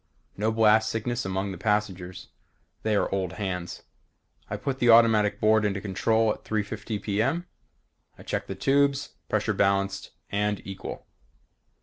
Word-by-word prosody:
No 110 +2 0
blast 110 0 +4
sickness 115 0 -2
among 95 +1 -2
the 90 - -8
passengers. 95 -4 -2 0.5
They 110 -1 +1
are - - +2
old 95 -2 -1
hands. 90 -4 -4 0.7
I - - -3
put 135 -1 -3
the 120 - +3
automatic 115 -3 +5
board 110 0 +4
into 100 -1 0
control 110 +3 +1
at - - -14
3:50 110 0 -3
p. 105 0 0
m. 160 +9 0 0.7
I - - -13
checked - - -3
the - - -5
tubes. 140 +1 +2 0.2
Pressures - - 0
balanced 100 -1 +1 0.2
and 105 0 0
equal. 95 -1 -7
105 Hz, 145 wpm, -26 LUFS, 100-110 Hz, 0.7 s, automatic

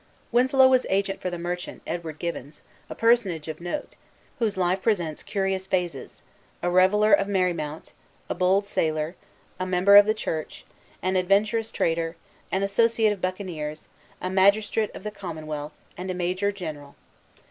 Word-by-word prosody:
Winslow 260 +2 +5
was 255 -1 +3
agent 195 0 0
for 180 - -2
the 175 - -5
merchant, 175 +1 -5
Edward 165 -2 -5
Gibbons, 150 -4 -6 0.3
a - - -6
personage 210 -10 +2
of 155 +1 -6
note, 175 +12 -5 0.4
whose 215 -5 0
life 185 +1 +1
presents 175 -9 0
curious 195 -2 -2
phases, 175 -9 -3 0.4
a 175 - +1
reveller 200 +4 +4
of 200 0 +4
Merry 185 -3 +1
Mount, 155 -1 -6 0.3
a - - -2
bold 190 +3 +2
sailor, 155 -3 -1 0.4
a 185 - -2
member 185 +2 +6
of 205 0 +8
the 215 - +2
church, 160 -7 -4 0.4
an 185 +1 0
adventurous 215 +5 +2
trader, 165 0 -1 0.4
an 190 +1 0
associate 220 +2 +3
of 195 - -10
buccaneers, 170 -5 -4 0.3
a 185 - -3
magistrate 205 +3 +3
of - - -9
the 210 - -4
commonwealth, 155 -6 -6 0.2
and 185 +1 -6
a 185 - -2
major 185 +3 0
general. 155 -7 -8
185 Hz, 160 wpm, -25 LUFS, 170-205 Hz, 0.4 s, of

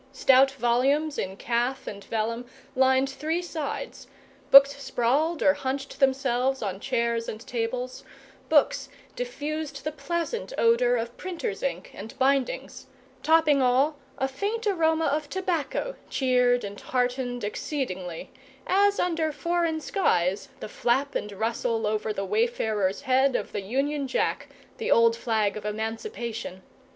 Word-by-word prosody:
Stout 270 0 +5
volumes 275 +5 +1
in 190 +1 -3
calf 240 +4 -1
and 200 -1 -7
vellum 230 +2 -2 0.3
lined 265 +1 +4
three 310 +6 -2
sides; 315 -5 -5 0.4
books 275 +1 +9
sprawled 275 +6 +1
or 285 - +6
hunched 270 0 -4
themselves 265 -1 +1
on 195 -2 -3
chairs 235 -1 -1
and 215 - -6
tables; 245 +2 -3 0.5
books - - +3 0.3
diffused 315 - -4
the 305 - -2
pleasant 340 - -3
odour 240 +2 +4
of 235 0 -3
printers' 370 +6 -4
ink - - -3
and 215 +3 -9
bindings; 270 -1 0 0.3
topping 315 -3 +4
all, 260 +4 +3 0.2
a 265 - 0
faint 410 +12 -3
aroma 325 -5 +2
of 295 0 -1
tobacco 375 - -2
cheered 250 -2 +2
and 200 0 -7
heartened 245 -1 -1
exceedingly, 190 - -4 0.3
as 405 +2 +3
under 330 -3 0
foreign 335 +2 0
skies 200 - 0
the - - -4
flap 255 +6 0
and 210 - -3
rustle 225 +2 -1
over 215 +1 -1
the 195 -1 -3
wayfarer's 215 -1 0
head 265 -1 +3
of - - -2
the 205 - -3
Union 275 +7 -1
Jack 260 - -1 0.3
the 455 - -2
old 230 0 +5
flag 220 -3 0
of 215 - -6
emancipation! 220 - -4
260 Hz, 135 wpm, -26 LUFS, 230-305 Hz, 0.5 s, books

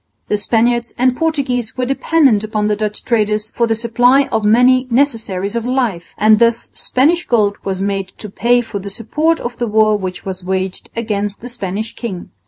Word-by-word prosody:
The 210 - +1
Spaniards 235 +2 0
and 255 0 +2
Portuguese 260 -8 -1
were 255 - 0
dependent 270 -4 +2
upon 215 -1 -2
the 210 - +1
Dutch 210 0 -4
traders 215 -2 0
for 235 - 0
the 225 - +1
supply 245 +4 +3
of 220 - 0
many 250 +4 +4
necessaries 225 -7 0
of 235 - -1
life; 235 -10 -2
and 215 0 +5
thus 235 0 +1
Spanish 320 +7 +1
gold 210 -4 +2
was 190 0 -3
made 195 -1 -2
to 210 - -8
pay 240 +5 +2
for 225 -3 -6
the 200 +1 -7
support 305 +11 0
of 240 0 -5
the 240 - -2
war 215 0 +3
which 185 -3 -5
was 190 -1 -6
waged 190 0 -3
against 205 -3 -3
the 245 - -7
Spanish 215 -2 -5
king. 195 -7 -6
225 Hz, 190 wpm, -17 LUFS, 205-245 Hz, -, and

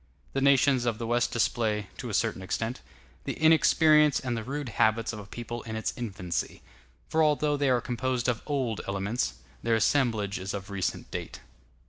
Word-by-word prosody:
The 135 - 0
nations 135 -2 +4
of 115 -2 0
the 115 - -4
West 120 +1 +1
display, 110 -3 0
to - - -5
a - - -5
certain - - 0
extent, 115 +6 -3 0.4
the - - -2
inexperience 155 -1 +5
and 125 -2 -2
the 115 - -3
rude 140 +2 -4
habits 110 +1 +1
of 110 - -6
a 100 - -10
people 120 +1 -6
in 110 -1 -6
its 110 - -2
infancy; 95 -8 -4 0.4
for 160 - +1
although 150 -1 +2
they 140 -1 +1
are 125 -2 +3
composed 125 0 -1
of 120 -3 0
old 130 -7 -1
elements, 100 +5 -1 0.3
their 115 0 +2
assemblage 110 -3 +1
is 95 +2 -4
of 100 0 -7
recent 95 -2 -3
date. - - -6
120 Hz, 180 wpm, -28 LUFS, 110-135 Hz, 0.4 s, inexperience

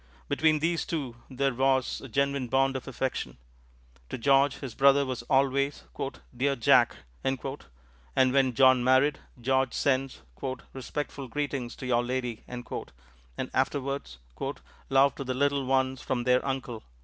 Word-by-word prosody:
Between 155 - +3
these 165 +2 0
two 140 -8 -4
there 135 0 0
was 130 0 +1
a 135 - -8
genuine 140 +1 0
bond 135 +2 +2
of 130 - -5
affection. 130 -1 -3 0.7
To - - -4
George 135 +2 +3
this 135 -5 -6
brother 140 +2 +5
was 130 -2 -3
always, 140 +1 +2 0.5
"Dear 140 +3 +1
Jack," 115 - +4 0.3
and 135 0 0 1.0
when 130 -3 +3
John 130 -1 +6
married, 130 +3 +4 0.2
George 130 +1 +1
sends 135 - 0 0.5
"respectful 135 +1 -5
greetings 135 -2 -3
to - - -8
your 120 -1 +2
Lady," 125 -2 -3
and 125 -1 -6 0.9
afterwards 140 - -1 0.7
"love 135 +1 +5
to 140 - -6
the 130 -1 -3
little 140 0 +1
ones 130 0 +1
from 125 -2 -1
their 125 +1 +3
Uncle." 130 -4 -3
135 Hz, 135 wpm, -28 LUFS, 125-140 Hz, 1.0 s, John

